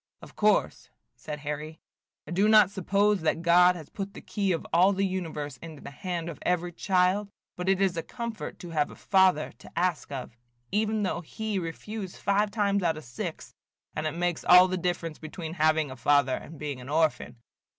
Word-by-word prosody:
"Of - - -13
course," - - +1 0.3
said 150 +5 -7
Harry, 150 +1 -5 0.5
"I 150 - -10
do 195 +4 +3
not 215 -3 +7
suppose 200 +1 +1
that 160 +1 0
God 180 +1 +6
has 160 -4 -10
put 195 -1 -6
the - - -8
key 200 -3 -1
of 165 - -2
all 185 +4 +5
the 195 +1 +1
universe 160 -7 -4
into 160 0 -10
the - - -8
hand 175 +1 -4
of 170 - -7
every 175 0 0
child; 185 +3 +1 0.3
but 180 +1 -2
it 195 -1 +3
is 190 -3 +2
a 165 - -1
comfort 235 +4 -6
to 175 -2 -8
have 150 -2 +1
a - - -11
Father 190 -5 +3
to - - -14
ask 175 -4 0
of, 130 -4 -6 0.4
even 215 0 +1
though 185 -2 -1
he 210 +4 -3
refuse 190 +3 -6
five 205 +1 +1
times 200 -2 +1
out 165 -3 +1
of 155 - -8
six, 120 0 -6 0.4
and 155 +1 -1
it 155 - -4
makes 175 -1 -1
all 180 +1 +8
the 185 - -2
difference 175 -3 -2
between 160 +1 -7
having 155 -3 +2
a - - -7
father 135 +1 +3
and 160 - -9
being 145 -4 -5
an 125 - -10
orphan. 155 -5 +1
175 Hz, 200 wpm, -28 LUFS, 155-195 Hz, 0.5 s, all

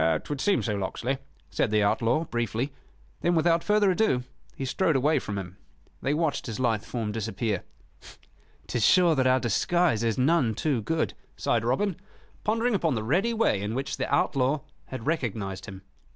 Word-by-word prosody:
"'Twould 145 -2 -4
seem 205 - +2
so, 110 - -1
Locksley," 120 +7 -2 0.3
said - - +1
the 105 0 +3
outlaw, 115 +8 +2
briefly. 120 0 -2 0.5
Then, 175 0 +2
without 165 +1 +3
further 210 -2 +3
ado, 180 - +2 0.3
he 135 - -4
strode 165 +4 +1
away 150 +4 +3
from 105 -1 -5
him. 95 0 -7 0.4
They 140 +2 +1
watched 160 -4 -1
his 115 0 -5
lithe 115 -5 +1
form 115 -4 -3
disappear. 110 -2 -2 1.0
"'Tis 120 - -1
sure 180 - +5
that 130 -3 +2
our 130 0 +4
disguise 130 - +1
is 115 -2 0
none 130 -4 +2
too 140 -3 0
good," 160 +9 -1 0.2
sighed 115 -2 +1
Robin, 155 - 0 0.5
pondering 230 +3 +1
upon 165 -8 +1
the 110 - -2
ready 180 - +1
way 225 - +1
in 105 +3 -3
which 135 +1 -3
the 130 - -3
outlaw 140 0 +2 0.2
had 130 -4 -7
recognized 110 - -2
him. 95 -2 -9
130 Hz, 170 wpm, -27 LUFS, 110-165 Hz, 1.0 s, sure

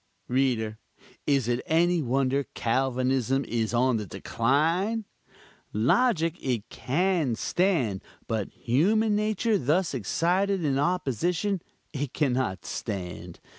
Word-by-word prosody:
Reader, 120 -4 0 0.5
is 135 -5 +2
it 120 +1 0
any 170 +1 +3
wonder 135 +1 +1
Calvinism 130 +1 +1
is 115 -2 -1
on 125 0 +2
the 105 -2 -4
decline? 165 - 0 0.7
Logic 165 - +2
it 120 -5 -1
can 160 -3 0
stand; 145 - 0 0.3
but 110 -4 -2
human 205 - +2
nature 215 +1 +1
thus 155 +6 +1
excited 175 - 0
in 135 -2 +1
opposition, 175 - 0 0.3
it 140 -2 -3
can 145 -5 +1
not 125 -7 -2
stand. 90 -4 -5
135 Hz, 110 wpm, -27 LUFS, 120-175 Hz, 0.7 s, any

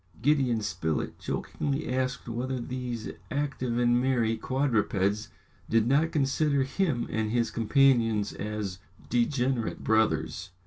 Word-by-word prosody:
Gideon 130 -3 +2
Spilett 80 -7 -2
jokingly 140 +1 -3
asked 130 -1 -2
whether 125 +2 -2
these 120 -2 -4 0.2
active 135 -4 -2
and 120 0 +3
merry 120 -4 +2
quadrupeds 110 -5 0 0.4
did 115 -1 +3
not 145 +6 +3
consider 140 -1 +2
him 135 -2 0
and 110 -1 0
his 115 -1 +1
companions 115 -3 +3
as 105 -3 -4 0.3
degenerate 125 0 0
brothers. 110 -3 +1
120 Hz, 115 wpm, -28 LUFS, 110-135 Hz, 0.4 s, and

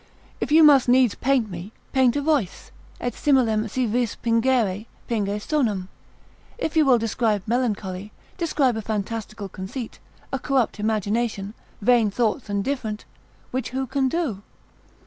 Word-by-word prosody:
if - - -3
you 320 +1 +7
must 280 -5 +6
needs 250 -3 +5
paint 260 -3 +1
me, 180 +4 -7 0.2
paint 260 -2 +4
a 290 - +1
voice, 285 - -1 0.3
et 245 - -2
similem 230 -6 +2
si 255 +4 0
vis 235 0 0
pingere, 230 -3 +1 0.2
pinge 210 -3 -1
sonum; 210 -8 -1 0.7
if 325 -11 -3
you 315 - +5
will 265 -4 +5
describe 225 -2 0
melancholy, 210 -5 -2 0.3
describe 290 -7 +1
a 220 - -3
fantastical 215 0 -4
conceit, 195 +6 -7 0.3
a 270 - 0
corrupt 260 -6 0
imagination, 215 -1 -1 0.3
vain 235 -1 +4
thoughts 220 +2 -1
and 200 -1 0
different, 225 -5 -3 0.5
which 260 -2 -2
who 265 +1 -2
can 265 +1 0
do? 270 - -2
230 Hz, 145 wpm, -24 LUFS, 210-260 Hz, 0.7 s, you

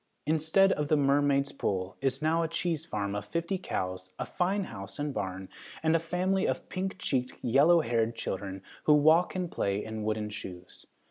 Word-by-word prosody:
Instead 160 +6 +3
of 150 -4 0
the 155 - +3
Mermaid's 140 0 +3
Pool 95 -7 -2
is 135 +1 0
now 160 +2 +3
a 165 - +1
cheese 165 -1 -2
farm 100 -1 -2
of 105 0 -3
fifty 170 +3 -2
cows, 95 - -4
a - - -3
fine 195 +3 0
house 100 - -8
and 145 -1 -2
barn, 95 -2 -4 0.4
and 160 0 +3
a - - +4
family 180 +4 0
of - - -3
pink 190 +1 -3
cheeked, 130 -7 -1
yellow 145 +8 +5
haired 115 -3 0
children 95 -3 -4 0.2
who 150 - +7
walk 160 +5 +4
and 180 -2 -2
play 100 +1 -1
in 110 0 -5
wooden 105 0 -2
shoes. 90 -4 -9
145 Hz, 185 wpm, -29 LUFS, 105-165 Hz, 0.4 s, who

